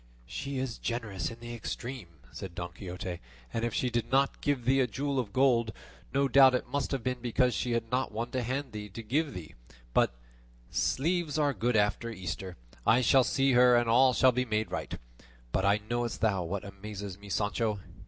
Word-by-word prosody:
"She 140 Hz, -, -5 dB
is 130 Hz, -3 st, -3 dB
generous 115 Hz, -5 st, -3 dB
in 115 Hz, 0 st, -11 dB
the 120 Hz, 0 st, -6 dB
extreme," 120 Hz, -1 st, -5 dB, 0.2 s
said 90 Hz, -3 st, -8 dB
Don 85 Hz, 0 st, -5 dB
Quixote, 90 Hz, -1 st, -6 dB, 0.3 s
"and 115 Hz, -, -1 dB
if 120 Hz, -, 0 dB
she 125 Hz, +3 st, 0 dB
did 120 Hz, -1 st, -1 dB
not 135 Hz, +1 st, +2 dB
give 140 Hz, -5 st, 0 dB
thee 135 Hz, +2 st, +4 dB
a 130 Hz, -, +3 dB
jewel 135 Hz, +3 st, -1 dB
of 110 Hz, -5 st, -3 dB
gold, 120 Hz, -3 st, +3 dB, 0.4 s
no 140 Hz, 0 st, +2 dB
doubt 130 Hz, 0 st, +7 dB
it -, -, -1 dB
must 140 Hz, +2 st, -1 dB
have 135 Hz, -4 st, -2 dB
been 125 Hz, -1 st, -1 dB
because 125 Hz, +1 st, +2 dB
she 125 Hz, -, -1 dB
had 115 Hz, 0 st, -2 dB
not 130 Hz, +1 st, 0 dB
one 115 Hz, +3 st, -4 dB
to 130 Hz, -, -1 dB
hand 130 Hz, +3 st, -2 dB
there 105 Hz, -1 st, -6 dB
to 115 Hz, +4 st, -8 dB
give 145 Hz, +6 st, 0 dB
thee; 85 Hz, -4 st, -8 dB, 0.4 s
but -, -, +3 dB, 0.6 s
sleeves 165 Hz, +2 st, 0 dB
are 145 Hz, -2 st, +2 dB
good 120 Hz, +2 st, 0 dB
after 105 Hz, +2 st, +1 dB
Easter; 95 Hz, -2 st, -5 dB, 0.3 s
I 120 Hz, -, +5 dB
shall 130 Hz, +2 st, +5 dB
see 135 Hz, +2 st, +2 dB
her 125 Hz, 0 st, +6 dB
and 120 Hz, 0 st, +3 dB
all 130 Hz, +3 st, +6 dB
shall 130 Hz, 0 st, +5 dB
be 125 Hz, +1 st, 0 dB
made 110 Hz, -2 st, -1 dB
right. -, -, -4 dB, 0.5 s
But 100 Hz, +5 st, +2 dB
knowest 120 Hz, 0 st, -2 dB
thou 100 Hz, -4 st, +2 dB
what 100 Hz, +4 st, -4 dB
amazes 100 Hz, -1 st, -7 dB
me, 100 Hz, 0 st, -12 dB
Sancho? 105 Hz, +2 st, 0 dB
120 Hz, 200 wpm, -30 LUFS, 105-130 Hz, 0.6 s, doubt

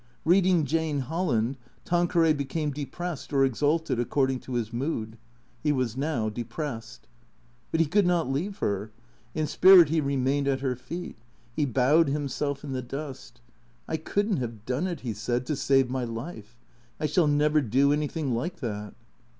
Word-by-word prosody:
Eeading 180 Hz, -1 st, +4 dB
Jane 155 Hz, 0 st, 0 dB
Holland, 135 Hz, -5 st, -1 dB, 0.3 s
Tanqueray 175 Hz, -2 st, +3 dB
became 150 Hz, +1 st, -2 dB
depressed 150 Hz, +3 st, -5 dB
or 135 Hz, -1 st, +4 dB
exalted 145 Hz, +2 st, 0 dB
according 130 Hz, +1 st, +1 dB
to 125 Hz, -, -6 dB
his 115 Hz, -1 st, -2 dB
mood. 115 Hz, -4 st, -3 dB, 0.4 s
He 150 Hz, -, +2 dB
was 130 Hz, -5 st, -1 dB
now 135 Hz, -5 st, -1 dB
depressed. 115 Hz, +1 st, -6 dB, 0.6 s
But 160 Hz, -, +1 dB
he -, -, +4 dB
could 185 Hz, +5 st, +2 dB
not 175 Hz, -4 st, +2 dB
leave 170 Hz, +10 st, -2 dB
her. 100 Hz, -, -2 dB, 0.5 s
In 155 Hz, -, 0 dB
spirit 180 Hz, 0 st, +7 dB
he 160 Hz, 0 st, +2 dB
remained 140 Hz, 0 st, 0 dB
at 135 Hz, -1 st, +1 dB
her 130 Hz, -2 st, 0 dB
feet. 170 Hz, +7 st, -7 dB, 0.4 s
He 150 Hz, -, +1 dB
bowed 135 Hz, +6 st, +4 dB
himself 140 Hz, 0 st, -2 dB
in 145 Hz, -, -6 dB
the 130 Hz, -1 st, -2 dB
dust. 130 Hz, -2 st, -8 dB, 0.2 s
" 120 Hz, 0 st, -35 dB
I 160 Hz, -, -1 dB
could 205 Hz, +6 st, -1 dB
n't 185 Hz, -, +1 dB
have 115 Hz, -3 st, -5 dB
done 130 Hz, +8 st, -1 dB
it," 175 Hz, -6 st, -4 dB
he 120 Hz, -3 st, -3 dB
said, 120 Hz, +4 st, -2 dB
"to 150 Hz, -, -1 dB
save 135 Hz, -2 st, +2 dB
my 130 Hz, -1 st, -1 dB
life. 115 Hz, -1 st, -7 dB, 0.4 s
I -, -, -1 dB
shall 160 Hz, +1 st, +3 dB
never 150 Hz, +1 st, +3 dB
do 135 Hz, +4 st, +3 dB
anything 150 Hz, -2 st, -1 dB
like 170 Hz, +10 st, -2 dB
that." 105 Hz, -, -5 dB
140 Hz, 170 wpm, -27 LUFS, 125-160 Hz, 0.6 s, spirit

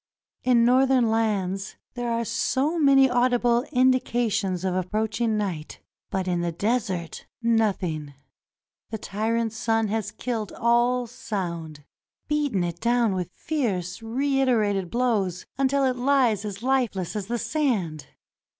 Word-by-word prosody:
In 240 Hz, -2 st, +4 dB
Northern 255 Hz, -1 st, +4 dB
lands 200 Hz, -4 st, -1 dB, 0.2 s
there 245 Hz, -1 st, -3 dB
are 230 Hz, 0 st, 0 dB
so 290 Hz, +9 st, 0 dB
many 275 Hz, -2 st, +6 dB
audible 245 Hz, 0 st, +2 dB
indications 240 Hz, -7 st, +1 dB
of 185 Hz, -, 0 dB
approaching 215 Hz, +4 st, -1 dB
night. 180 Hz, -7 st, -4 dB, 0.3 s
But 190 Hz, -2 st, -2 dB
in 175 Hz, -1 st, 0 dB
the 170 Hz, 0 st, -1 dB
desert 190 Hz, -3 st, -2 dB
— -, -, -69 dB, 0.2 s
nothing. 165 Hz, -9 st, -2 dB, 0.7 s
The 220 Hz, -, -4 dB
tyrant 225 Hz, +2 st, -1 dB
sun 225 Hz, -1 st, 0 dB
has 215 Hz, -1 st, -1 dB
killed 220 Hz, 0 st, -4 dB
all 240 Hz, +2 st, +2 dB
sound; 170 Hz, -, -5 dB, 0.4 s
beaten 290 Hz, -11 st, 0 dB
it 170 Hz, -1 st, -4 dB
down 235 Hz, -3 st, +2 dB
with 180 Hz, -2 st, -3 dB
fierce, 215 Hz, -, -2 dB
reiterated 230 Hz, -6 st, +1 dB
blows 210 Hz, -7 st, 0 dB
until 275 Hz, 0 st, +2 dB
it 255 Hz, -1 st, +1 dB
lies 250 Hz, -5 st, +2 dB
as 205 Hz, +1 st, -6 dB
lifeless 245 Hz, -9 st, 0 dB
as 205 Hz, -2 st, -3 dB
the 240 Hz, +1 st, -1 dB
sand. 220 Hz, -, -1 dB
225 Hz, 130 wpm, -25 LUFS, 190-250 Hz, 0.7 s, many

